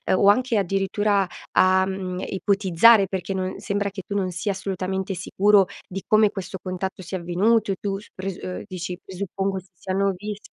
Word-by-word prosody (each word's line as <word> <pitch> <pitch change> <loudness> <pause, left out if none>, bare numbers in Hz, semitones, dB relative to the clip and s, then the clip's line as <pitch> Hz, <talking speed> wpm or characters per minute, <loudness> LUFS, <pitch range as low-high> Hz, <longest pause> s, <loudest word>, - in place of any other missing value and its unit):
o 195 - +3
anche 240 +1 +4
addirittura 195 +1 +1 0.3
a, 185 0 +5
mhmm, 185 -1 -4
ipotizzare, 195 +1 +4
perché 190 0 -3
no 185 0 -2
sembra 205 -1 -1
che 190 -1 -8
tu 200 - -5
non 190 -2 0
sia 180 +4 -2
assolutamente 190 0 -3
sicuro 195 +2 +4 0.2
di 190 +1 -6
come 215 -1 +5
questo 190 -1 -6
contatto 185 +1 -4
sia 185 +2 -4
avvenuto. 195 +5 +2
E 190 - -2
tu 195 -1 -2
s - - -16
pres 190 -1 -5
ehm, 180 - -5
dici: 180 -1 -5
"Presuppongo 195 +1 -3
si 185 +1 -18
siano 195 +2 -1
vis" 205 +2 -5
195 Hz, 175 wpm, -24 LUFS, 185-200 Hz, 0.3 s, a